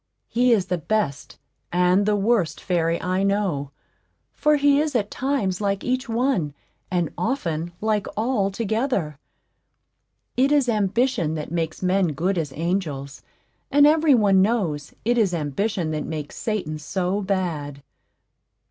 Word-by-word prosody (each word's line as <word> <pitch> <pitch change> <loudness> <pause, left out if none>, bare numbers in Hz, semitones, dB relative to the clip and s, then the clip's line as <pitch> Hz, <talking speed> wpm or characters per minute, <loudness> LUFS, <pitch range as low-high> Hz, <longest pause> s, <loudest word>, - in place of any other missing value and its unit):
He 245 +1 +3
is 205 -5 +3
the 180 -1 -2
best 160 -5 -2 0.3
and 180 +3 +3
the 210 - +3
worst 200 -6 +1
fairy 170 -2 0
I 185 +1 -1
know, 195 -8 0 0.6
for 300 0 +3
he 285 -1 +4
is 305 -3 -2
at 210 -3 0
times 230 -9 -1
like 200 -1 -1
each 255 -1 -1
one, 225 - 0 0.3
and 175 -4 0
often 175 - -2
like 215 -1 0
all 220 -3 +1
together. 205 - -1 1.2
It 265 +3 +3
is 285 -3 +3
ambition 210 -4 +1
that 155 0 -5
makes 165 0 -3
men 185 -3 +2
good 180 +5 0
as 150 -4 -3
angels; 155 -5 -3 0.5
and 290 0 +5
every 305 -1 +5
one 200 -4 +4
knows 190 -9 0
it 240 +1 +2
is 195 -5 +2
Ambition 165 +3 -1
that 155 -1 -3
makes 155 -2 -5
Satan 185 -9 -3
so 185 +6 -1
bad. 165 -8 -2
195 Hz, 140 wpm, -23 LUFS, 165-230 Hz, 1.2 s, and